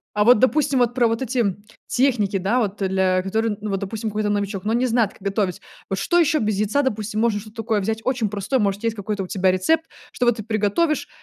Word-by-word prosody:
А 210 Hz, -, +3 dB
вот, 245 Hz, 0 st, +7 dB
допустим, 275 Hz, 0 st, +2 dB
вот 245 Hz, 0 st, +2 dB
про 245 Hz, -2 st, +3 dB
вот 230 Hz, +2 st, -1 dB
эти, 255 Hz, 0 st, -2 dB
м, 205 Hz, -3 st, 0 dB, 0.2 s
техники, 235 Hz, -7 st, +1 dB
да, 195 Hz, +6 st, +1 dB
вот, 205 Hz, -2 st, -2 dB
э, 190 Hz, -, +1 dB
для 185 Hz, -1 st, +1 dB
которые 220 Hz, +4 st, 0 dB
н 205 Hz, -, -7 dB
ну, 210 Hz, -, -3 dB
вот, 195 Hz, -1 st, -1 dB
допустим, 215 Hz, +2 st, -4 dB
какой-то 210 Hz, 0 st, -1 dB
новичок, 200 Hz, -2 st, -2 dB
но 215 Hz, -, 0 dB
он 235 Hz, -, +2 dB
не 255 Hz, -, +1 dB
знает, 230 Hz, -3 st, +1 dB
как -, -, -21 dB
готовить. 195 Hz, -2 st, -1 dB, 0.3 s
Вот 195 Hz, -, -2 dB
что 345 Hz, -, +1 dB
ещё 310 Hz, -2 st, +3 dB
без 215 Hz, -2 st, 0 dB
яйца, 215 Hz, +8 st, +1 dB
допустим, 215 Hz, -4 st, -2 dB
можно 225 Hz, -3 st, +1 dB
что-то 215 Hz, +2 st, -14 dB
такое 225 Hz, -1 st, 0 dB
взять 220 Hz, +3 st, -2 dB
очень 250 Hz, -4 st, 0 dB
простое, 205 Hz, +5 st, -1 dB
может, 200 Hz, -1 st, 0 dB
есть 230 Hz, -1 st, 0 dB
какой-то 205 Hz, 0 st, -3 dB
у -, -, -5 dB
тебя 190 Hz, 0 st, +1 dB
рецепт, 315 Hz, +14 st, +1 dB, 0.3 s
чтоб 245 Hz, -, 0 dB
вот 240 Hz, -, +3 dB
ты 215 Hz, -, -5 dB
приготовишь, 225 Hz, +9 st, 0 dB
215 Hz, 255 wpm, -22 LUFS, 200-240 Hz, 0.3 s, вот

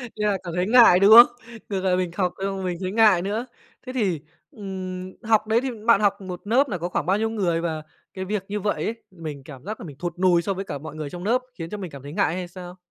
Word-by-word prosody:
Như 210 Hz, -, -3 dB
nà 205 Hz, -2 st, +2 dB
cảm 170 Hz, -2 st, -6 dB
thấy 180 Hz, +2 st, 0 dB
ngại, 230 Hz, -6 st, +7 dB
đúng 200 Hz, +2 st, +6 dB
không? 235 Hz, +2 st, +12 dB, 0.4 s
Ngược 195 Hz, -2 st, -2 dB
lại 185 Hz, -1 st, +2 dB
mình 180 Hz, -2 st, -1 dB
học 180 Hz, -2 st, 0 dB
xong 195 Hz, -1 st, -2 dB
mình 180 Hz, -2 st, -2 dB
thấy 185 Hz, 0 st, -2 dB
ngại 210 Hz, -5 st, +5 dB
nữa. 210 Hz, +6 st, -2 dB, 0.4 s
Thế 255 Hz, -, -6 dB
thì, 190 Hz, -, 0 dB, 0.3 s
ừm, 185 Hz, -5 st, -6 dB
học 220 Hz, -1 st, +2 dB
đấy 225 Hz, +2 st, +3 dB
thì 265 Hz, -, -2 dB, 0.2 s
bạn 230 Hz, -, +6 dB
học 200 Hz, -1 st, +1 dB
một 180 Hz, -2 st, -7 dB
lớp 260 Hz, +6 st, +3 dB
là 185 Hz, -, -2 dB
có 175 Hz, +2 st, -4 dB
khoảng -, -, -2 dB
bao 190 Hz, +3 st, +2 dB
nhiêu 225 Hz, +1 st, 0 dB
người? 180 Hz, -7 st, 0 dB
Và 160 Hz, -2 st, -3 dB, 0.3 s
cái 190 Hz, 0 st, -5 dB
việc 205 Hz, 0 st, -2 dB
như 205 Hz, +1 st, -3 dB
vậy 205 Hz, +1 st, -1 dB
ấy, 225 Hz, +1 st, -4 dB
mình 155 Hz, -6 st, -8 dB
cảm 135 Hz, -2 st, -12 dB
giác 215 Hz, +2 st, -5 dB
nà -, -, -8 dB
mình 145 Hz, -5 st, -10 dB
thụt 175 Hz, 0 st, -5 dB
nùi 180 Hz, -2 st, +4 dB
so 195 Hz, +3 st, -2 dB
với 195 Hz, +1 st, -5 dB
cả 145 Hz, -, -5 dB
mọi 155 Hz, +2 st, -9 dB
người 155 Hz, -2 st, -5 dB
trong 175 Hz, +3 st, -8 dB
lớp 240 Hz, +5 st, +2 dB, 0.2 s
khiến 165 Hz, -1 st, -6 dB
cho 210 Hz, -, -5 dB
mình 185 Hz, -5 st, -7 dB
cảm 140 Hz, -2 st, -10 dB
thấy 145 Hz, +1 st, -8 dB
ngại 195 Hz, -3 st, +1 dB
hay 180 Hz, -1 st, -4 dB
sao? 180 Hz, 0 st, -10 dB
190 Hz, 280 wpm, -24 LUFS, 175-210 Hz, 0.4 s, không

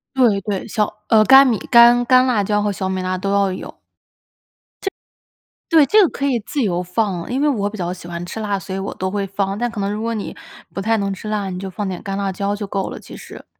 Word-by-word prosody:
对 230 Hz, -7 st, +3 dB
对， 195 Hz, -1 st, -4 dB
小， 210 Hz, -1 st, -1 dB
呃， 220 Hz, -1 st, +5 dB
干 270 Hz, +4 st, +8 dB
米 235 Hz, -4 st, +2 dB
干 240 Hz, 0 st, +7 dB
干 255 Hz, 0 st, +5 dB
辣 230 Hz, -6 st, +1 dB
椒 210 Hz, +1 st, 0 dB
和 205 Hz, 0 st, 0 dB
小 190 Hz, -1 st, -3 dB
米 190 Hz, 0 st, -2 dB
辣 185 Hz, 0 st, -2 dB
都 195 Hz, +2 st, -2 dB
要 200 Hz, -1 st, +2 dB
有。 185 Hz, -, -7 dB, 1.1 s
这 390 Hz, -, -1 dB, 0.8 s
对 320 Hz, -4 st, +6 dB
这 425 Hz, 0 st, +5 dB
个 350 Hz, -, +4 dB
可 280 Hz, -, -5 dB
以 250 Hz, -5 st, +1 dB
自 275 Hz, +6 st, -3 dB
由 180 Hz, -4 st, 0 dB
放， 180 Hz, 0 st, -2 dB
因 265 Hz, +3 st, 0 dB
为 300 Hz, -, +3 dB
我 205 Hz, -8 st, 0 dB
比 215 Hz, -, -8 dB
较 175 Hz, 0 st, -2 dB
喜 175 Hz, -1 st, -10 dB
欢 170 Hz, 0 st, -5 dB
吃 220 Hz, -, -6 dB
辣， 205 Hz, -2 st, -1 dB
所 190 Hz, +1 st, -7 dB
以 -, -, -3 dB
我 195 Hz, -, -4 dB
都 185 Hz, 0 st, -3 dB
会 200 Hz, 0 st, -2 dB
放， 195 Hz, +1 st, -2 dB
但 240 Hz, 0 st, -1 dB
可 225 Hz, -3 st, -6 dB
能 200 Hz, +1 st, -1 dB
如 215 Hz, +1 st, -4 dB
果 230 Hz, 0 st, -2 dB
你 210 Hz, -, -5 dB, 0.4 s
不 195 Hz, -, -3 dB
太 225 Hz, +3 st, +1 dB
能 200 Hz, -1 st, -1 dB
吃 205 Hz, +3 st, -7 dB
辣， 205 Hz, -2 st, -2 dB
你 180 Hz, -, -5 dB
就 190 Hz, 0 st, -5 dB
放 200 Hz, +3 st, -4 dB
点 185 Hz, -2 st, -5 dB
干 195 Hz, -1 st, -4 dB
辣 195 Hz, -1 st, -1 dB
椒 200 Hz, +2 st, -2 dB
就 205 Hz, -, -5 dB
够 195 Hz, -1 st, -3 dB
了， -, -, -7 dB
其 -, -, -11 dB
实。 -, -, -12 dB
205 Hz, 280 characters per minute, -19 LUFS, 190-230 Hz, 1.1 s, 干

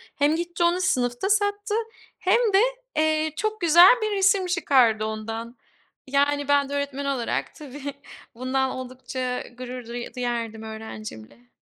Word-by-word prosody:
hem 290 Hz, +2 st, +2 dB
gitti 345 Hz, +1 st, -2 dB
onu 345 Hz, +2 st, +2 dB
sınıfta 245 Hz, +1 st, 0 dB
sattı 410 Hz, 0 st, +1 dB, 0.4 s
hem 375 Hz, +5 st, +3 dB, 0.2 s
de, 390 Hz, -, +6 dB, 0.4 s
eee, 310 Hz, 0 st, +2 dB
çok 430 Hz, -1 st, -2 dB
güzel 345 Hz, +6 st, +8 dB
bir 430 Hz, -1 st, 0 dB
resim 385 Hz, -1 st, +3 dB
çıkardı 255 Hz, -11 st, +3 dB
ondan. 225 Hz, +2 st, -5 dB, 0.5 s
Yani, 285 Hz, +1 st, +1 dB
ben 285 Hz, -1 st, +3 dB
de 285 Hz, -, -5 dB
öğretmen 280 Hz, 0 st, -3 dB
olarak, 230 Hz, -, -2 dB
tabii 285 Hz, -1 st, -7 dB, 0.4 s
bundan 260 Hz, +2 st, 0 dB
oldukça, 255 Hz, 0 st, -7 dB
ııı, 250 Hz, -1 st, -3 dB
gurur 250 Hz, -1 st, -7 dB
du 240 Hz, +1 st, -6 dB
duyardım 235 Hz, -3 st, -3 dB
öğrencimle. 220 Hz, -, -9 dB
275 Hz, 140 wpm, -24 LUFS, 240-340 Hz, 0.5 s, güzel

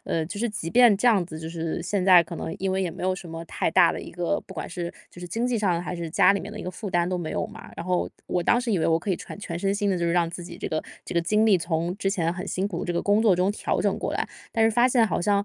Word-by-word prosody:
呃， 160 Hz, -, -1 dB
就 180 Hz, +5 st, -6 dB
是 240 Hz, +3 st, 0 dB
即 185 Hz, -6 st, -4 dB
便 240 Hz, -4 st, +6 dB
这 225 Hz, +5 st, 0 dB
样 210 Hz, -6 st, +4 dB
子， 155 Hz, -2 st, -8 dB
就 160 Hz, 0 st, -6 dB
是 165 Hz, 0 st, -3 dB
现 195 Hz, +2 st, -1 dB
在 180 Hz, -2 st, +7 dB
可 170 Hz, +1 st, -8 dB
能 160 Hz, -, -4 dB
因 190 Hz, 0 st, -1 dB
为 190 Hz, -, 0 dB
也 185 Hz, -3 st, -1 dB
没 165 Hz, -, -9 dB
有 185 Hz, 0 st, +1 dB
什 180 Hz, -2 st, -9 dB
么 165 Hz, +1 st, -6 dB
太 165 Hz, -, -1 dB
大 175 Hz, 0 st, +5 dB
的 -, -, -5 dB
一 -, -, -9 dB
个， 175 Hz, +3 st, -1 dB
不 190 Hz, -, -10 dB
管 -, -, -4 dB
是， 175 Hz, -1 st, -4 dB, 0.2 s
就 175 Hz, -, -13 dB
是 180 Hz, -, -6 dB
经 230 Hz, +7 st, -1 dB
济 245 Hz, -2 st, 0 dB
上 180 Hz, -5 st, +1 dB
还 180 Hz, -, -4 dB
是 170 Hz, -1 st, -4 dB
家 180 Hz, -, +5 dB
里 200 Hz, -, 0 dB
面 205 Hz, -, -7 dB
的 215 Hz, -, -8 dB
一 -, -, -5 dB
个 180 Hz, -, -4 dB
负 205 Hz, +3 st, -6 dB
担 175 Hz, -1 st, +1 dB
都 180 Hz, -1 st, -1 dB
没 160 Hz, -3 st, -4 dB
有 -, -, -1 dB
嘛。 215 Hz, 0 st, -12 dB
然 170 Hz, -, -5 dB
后 180 Hz, -1 st, 0 dB, 0.2 s
我 180 Hz, -, 0 dB
当 240 Hz, -, +3 dB
时 240 Hz, -2 st, -2 dB
以 190 Hz, -, +2 dB
为 -, -, +1 dB
我 165 Hz, 0 st, +3 dB
可 185 Hz, +4 st, -4 dB
以 185 Hz, -, +1 dB
全 -, -, -9 dB
全 170 Hz, -4 st, -5 dB
身 195 Hz, +2 st, 0 dB
心 205 Hz, 0 st, 0 dB
地 185 Hz, -, 0 dB
就 170 Hz, -, -1 dB
是 170 Hz, -, +1 dB
让 170 Hz, -1 st, +2 dB
自 175 Hz, +1 st, -7 dB
己 -, -, -9 dB
这 -, -, -4 dB
个 155 Hz, -, -1 dB, 0.2 s
这 -, -, -7 dB
个 170 Hz, -, +3 dB
精 210 Hz, +6 st, +2 dB
力 205 Hz, -4 st, +5 dB
从 170 Hz, +1 st, -2 dB
之 200 Hz, -, -1 dB
前 170 Hz, -4 st, 0 dB
很 180 Hz, +1 st, -6 dB
辛 190 Hz, +2 st, -1 dB
苦， 175 Hz, -5 st, -4 dB
这 175 Hz, -, -2 dB
个 170 Hz, -, -1 dB
工 205 Hz, +2 st, +3 dB
作 210 Hz, -5 st, +5 dB
中 180 Hz, +2 st, +2 dB
调 -, -, -1 dB
整 -, -, +1 dB
过 -, -, -3 dB
来， -, -, -2 dB, 0.2 s
但 225 Hz, -2 st, +3 dB
是 225 Hz, -, +4 dB
发 240 Hz, +3 st, +4 dB
现 240 Hz, -3 st, +4 dB
好 175 Hz, -, -1 dB
像 200 Hz, +2 st, +2 dB
180 Hz, 370 characters per minute, -25 LUFS, 170-205 Hz, 0.2 s, 在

